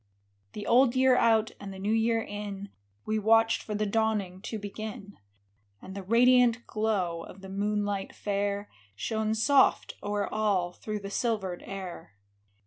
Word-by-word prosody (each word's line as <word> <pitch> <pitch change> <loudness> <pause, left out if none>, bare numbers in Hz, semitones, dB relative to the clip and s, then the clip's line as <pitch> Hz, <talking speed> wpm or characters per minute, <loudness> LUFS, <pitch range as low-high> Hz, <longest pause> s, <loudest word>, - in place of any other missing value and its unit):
HE 205 - -5
old 250 +1 +4
year 260 0 +5
out 225 -2 +3
and 200 -1 -7
the 190 - -9
new 205 +3 -1
year 225 0 +2
in, 205 -1 -6 0.4
We 215 0 0
watched 225 +1 +4
for 210 - -5
the 210 +1 0
dawning 205 -3 0
to 220 - -5
begin; 205 0 -7 0.6
And 190 - -10
the 200 - -5
radiant 240 +3 +4
glow 195 -6 -1
of 185 +3 -11
the 190 - -9
moonlight 205 0 -2
fair 200 0 -2 0.3
Shone 220 - -1
soft 270 +5 +3
o'er 205 0 -1
all 195 -5 0
through 215 +1 -5
the 200 0 -7
silvered 200 -6 -1
air. 185 - -7
210 Hz, 150 wpm, -28 LUFS, 195-225 Hz, 0.6 s, year